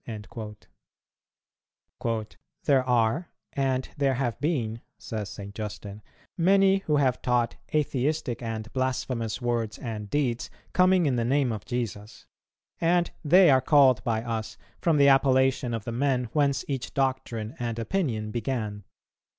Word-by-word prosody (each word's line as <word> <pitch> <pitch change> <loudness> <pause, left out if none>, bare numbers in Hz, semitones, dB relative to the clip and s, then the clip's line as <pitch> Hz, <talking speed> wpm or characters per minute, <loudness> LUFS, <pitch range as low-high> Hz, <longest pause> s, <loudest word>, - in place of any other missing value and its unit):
"[258:1] 110 0 -9 0.3
"There 135 -3 +3
are, 125 +6 +1 0.2
and 130 -2 0
there 135 -2 +2
have 120 -3 -2
been," 120 -8 -1 0.2
says 105 -3 -5
St. 100 0 -8
Justin, 105 -1 -7 0.3
"many 195 +2 +4
who 150 - +3
have 130 -3 +2
taught 120 -2 +1 0.2
atheistic 145 -3 0
and 110 -1 -5
blasphemous 125 -3 -2
words 115 -3 -1
and 105 -4 -6
deeds, 130 -3 -1 0.2
coming 185 -1 +4
in 130 -4 +1
the 120 - +1
name 130 +1 +2
of 110 -2 -5
Jesus; 110 -3 -5 0.5
and 175 +1 +2
they 175 +1 +6
are 130 -1 +5
called 130 -4 +5
by 115 -1 -1
us 115 -1 -4 0.2
from 165 -3 +2
the 140 -1 +6
appellation 130 -2 +3
of 115 -2 -3
the 115 - -5
men 130 +1 +1
whence 140 -2 +1
each 135 -2 -4
doctrine 130 -5 -1
and 120 -2 -3
opinion 115 - -1
began 110 -3 -3
125 Hz, 135 wpm, -27 LUFS, 110-140 Hz, 0.5 s, they